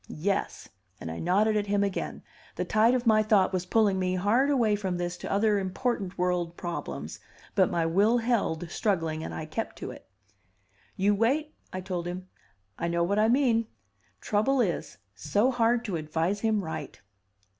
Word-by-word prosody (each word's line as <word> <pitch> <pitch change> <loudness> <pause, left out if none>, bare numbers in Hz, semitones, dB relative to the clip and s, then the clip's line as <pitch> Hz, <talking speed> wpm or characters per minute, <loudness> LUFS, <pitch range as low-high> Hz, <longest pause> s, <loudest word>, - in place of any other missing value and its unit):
Yes." 200 0 -1 0.3
And 80 - -6
I 80 - -6
nodded 205 +5 +2
at 205 -1 0
him 200 0 +2
again. 200 -2 -3 0.3
The - - -2
tide 225 +3 +4
of 250 -1 -1
my 215 -1 +5
thought 210 -3 +3
was 180 -1 -2
pulling 205 -2 +3
me 185 0 0
hard 220 +9 +2
away 235 -7 +3
from 190 -3 -2
this 175 0 -2
to - - -6
other 205 +1 +3
important 195 0 -2
world 175 -1 -1
problems, 75 - -5 0.3
but - - +3
my 165 -1 0
will 200 +8 +3
held, 205 -9 -1
struggling, 165 -6 -1
and - - -5
I 160 - -5
kept 220 +9 -4
to - - -6
it. - - -13 0.9
"You 205 +1 +2
wait," 275 +9 +1 0.2
I 185 - -4
told 180 -2 -4
him. 185 +1 -6 0.5
"I 170 - -1
know 170 0 +1
what 200 +4 +1
I 215 - +4
mean. 235 -3 +3 0.5
Trouble 230 +6 +1
is, 185 -10 -1 0.2
so 205 - +1
hard 240 0 +2
to 195 -6 -2
advise 160 +5 -1
him 215 -2 +1
right." 160 -3 -6
200 Hz, 175 wpm, -28 LUFS, 175-225 Hz, 0.9 s, my